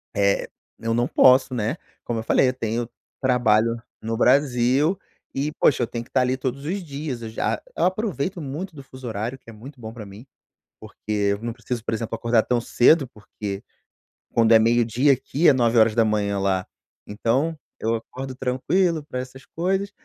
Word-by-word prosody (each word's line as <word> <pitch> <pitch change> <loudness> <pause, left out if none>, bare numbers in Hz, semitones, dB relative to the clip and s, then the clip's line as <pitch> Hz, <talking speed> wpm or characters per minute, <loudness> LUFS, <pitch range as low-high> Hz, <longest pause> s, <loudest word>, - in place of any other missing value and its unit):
eh, 100 0 +2 0.3
eu 115 0 -1
não 120 +2 +1
posso, 130 0 +5
né, 115 +2 -1 0.3
como 115 -1 -2
eu 110 - -4
falei 125 - +3
eu - - -2
tenho 115 -1 -3 0.3
trabalho 115 -2 +2 0.2
no 115 +1 -2
Brasil 135 +5 +3 0.4
e 140 +3 -1
poxa 130 - +4
eu - - -1
tenho 120 0 -5
que - - -22
estar 130 - +2
ali 130 +1 +1
todos 135 +2 -4
os 185 +3 -2
dias, 140 -5 -5
eu 110 - -5
já 110 - -1 0.2
eu - - +2
aproveito 185 - -1
muito 155 +5 -6
do 140 - -10
fuso 130 -1 -10
horário 115 +4 -3
que - - -16
é - - -10
muito 130 +5 -12
bom 110 - -6
pra 110 -3 -8
mim, 100 +5 -12 0.6
porque - - -13
eu 100 -1 +1
não 115 0 -3
preciso, 120 0 -5
por - - -1
exemplo, 115 0 -3
acordar 115 -1 +2
tão 125 -1 0
cedo, 130 +4 +4
porque, 105 -3 -7 0.7
quando 115 -1 +4
é 110 - +8
meio-dia 120 +4 +3
aqui 140 +5 0
é - - +8
9h 110 -4 +2
lá. 95 -1 0 0.4
Então 125 +10 0 0.2
eu 115 +1 0
acordo 130 +3 -7
tranquilo 155 +7 0
pra 130 -3 -5
essas 130 +1 -9
coisas, 190 +4 -1
120 Hz, 185 wpm, -23 LUFS, 115-135 Hz, 0.7 s, é